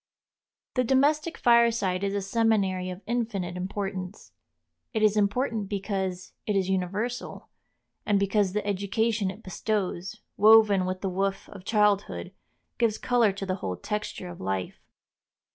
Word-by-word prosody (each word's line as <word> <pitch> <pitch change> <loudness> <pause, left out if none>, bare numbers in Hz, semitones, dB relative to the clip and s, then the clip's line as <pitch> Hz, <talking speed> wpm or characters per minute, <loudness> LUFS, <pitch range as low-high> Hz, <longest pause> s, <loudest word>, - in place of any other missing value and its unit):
The 255 - +2
domestic 290 +6 +2
fireside 230 -6 +3
is 200 0 -1
a 200 - -1
seminary 195 -3 +1
of 180 +2 -8
infinite 220 -7 -2
importance. 190 +1 -5 0.6
It 220 -2 0
is 215 -1 +4
important 210 0 0
because 190 -2 -3
it 210 - +1
is 190 -1 +1
universal, 205 +7 -3 0.5
and 205 -2 +2
because 200 -1 +1
the 210 0 -1
education 205 +1 0
it 205 +4 -9
bestows, 195 0 -3 0.2
woven 210 -3 +6
with 185 +1 -3
the 195 - -1
woof 195 +1 -2
of 195 -2 -11
childhood, 210 -2 +1 0.5
gives 230 -3 +2
color 240 -4 +3
to 195 0 -5
the 185 0 -2
whole 95 - -3
texture 210 -3 -4
of 175 - -9
life. 95 -1 -3
200 Hz, 140 wpm, -27 LUFS, 185-220 Hz, 0.6 s, woven